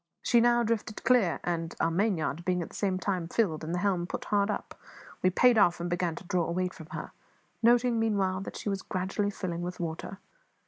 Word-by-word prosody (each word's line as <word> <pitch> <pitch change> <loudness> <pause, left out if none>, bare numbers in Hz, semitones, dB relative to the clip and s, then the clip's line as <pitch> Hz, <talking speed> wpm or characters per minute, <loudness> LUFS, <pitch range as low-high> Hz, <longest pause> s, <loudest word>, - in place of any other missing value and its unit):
She 240 -1 +4
now 240 0 +4
drifted 220 -1 -2
clear; 240 -9 +3
and, 165 -1 -2
our 165 - +2
mainyard 170 -4 0
being 180 -1 0
at - - -9
the - - -13
same 190 -2 0
time 185 -3 -2
filled 170 -6 0
and 160 - -4
the 175 - 0
helm 180 -3 +1
put - - -5
hard 200 0 +1
up, 210 - -3 0.5
we 185 - +4
paid 235 +5 +5
off 175 -4 +4
and 175 0 -3
began 175 -2 0
to - - -9
draw 175 -1 0
away 180 +2 -1
from 160 -3 -12
her, - - -6 0.5
noting, 240 0 +4
meanwhile, 200 -4 +1
that - - -7
she - - -7
was 195 -1 -1
gradually 195 +2 -2
filling 180 -4 -4
with 180 +1 -5
water. 170 +3 -4
185 Hz, 215 wpm, -29 LUFS, 175-210 Hz, 0.5 s, paid